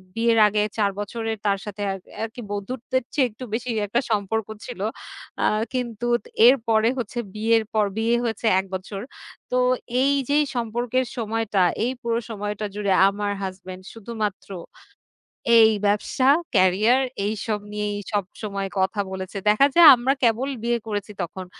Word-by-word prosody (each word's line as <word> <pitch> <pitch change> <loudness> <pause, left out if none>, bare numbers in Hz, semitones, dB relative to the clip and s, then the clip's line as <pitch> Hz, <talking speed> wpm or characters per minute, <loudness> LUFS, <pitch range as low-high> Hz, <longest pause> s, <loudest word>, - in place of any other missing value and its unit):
বিয়ের 230 0 +2
আগে 210 0 +1 0.2
৪ 205 -2 +2
বছরের, 225 +1 -3
তার 200 -1 +2
সাথে 205 0 -7
আর 195 - -4 0.3
আরকি 225 +2 -6
বন্ধুত্বের 240 +5 -3
চেয়ে 270 -3 +3
একটু 220 +4 -11
বেশি 245 +2 -3 0.2
একটা 235 +4 +1
সম্পর্ক 215 +1 -1 0.2
ছিল। 245 -6 -8 0.6
আ - - +3 0.3
কিন্তু 240 -2 -3 0.4
এরপরে 230 -3 +3
হচ্ছে 240 -1 -4 0.2
বিয়ের 225 +1 +2
পর, 215 -1 +3
বিয়ে 230 +2 +2
হয়েছে 225 -1 -3
১ 190 - -3
বছর। 195 +1 -6 0.5
তো 250 - +2 0.4
এই 280 +1 +3 0.2
যেই 295 +1 +3
সম্পর্কের 240 +2 -1
সময়টা, 225 -3 -1 0.2
এই 250 - 0
পুরো 235 -1 0
সময়টা 210 0 -4
জুড়ে, 205 -1 -1 0.2
আমার 205 0 -3
হাসব্যান্ড 185 0 -7
শুধুমাত্র 220 -3 -5 1.1
এই 220 0 +7 0.2
ব্যবসা, 235 +6 +1 0.3
ক্যারিয়ার, 205 +7 +4 0.2
এইসব 215 0 -2
নিয়েই 210 0 -2 0.2
সবসময় 200 0 -3
কথা 190 +2 0
বলেছে। 190 +1 -6
দেখা 215 +7 +5
যায়, 340 -2 +9
আমরা 250 +2 +1
কেবল 240 +4 +2
বিয়ে 235 0 +1
করেছি 205 0 -4
তখন। 185 +2 -5
220 Hz, 145 wpm, -23 LUFS, 205-235 Hz, 1.1 s, যায়